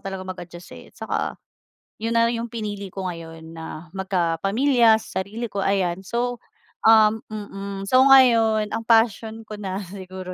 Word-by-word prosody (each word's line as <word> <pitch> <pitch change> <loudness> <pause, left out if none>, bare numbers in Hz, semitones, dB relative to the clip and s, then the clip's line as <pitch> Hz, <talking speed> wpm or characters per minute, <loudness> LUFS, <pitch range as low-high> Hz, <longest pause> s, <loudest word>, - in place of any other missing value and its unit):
talaga 190 -1 -5
mag-adjust, 175 -1 -9
eh, - - -12
saka - - -3 0.7
yun 230 +1 -1
na 230 - +5
yung 235 0 -4
pinili 205 -4 -5
ko 190 +1 -6
ngayon, 165 -1 -9
na 160 0 -9
magkapamilya 195 - +2
sa 220 - -4
sarili 220 +5 -5
ko, 200 0 -3
ayan. 190 -2 0
So, 240 +4 -3 0.4
um 220 -1 +6
mm, 200 -2 -6
so 255 +6 +4
ngayon, 225 -5 +5
ang 225 - -2
passion 225 -1 +2
ko 215 - -9
na 190 -2 -4
siguro 185 0 -8
200 Hz, 150 wpm, -23 LUFS, 185-225 Hz, 0.7 s, um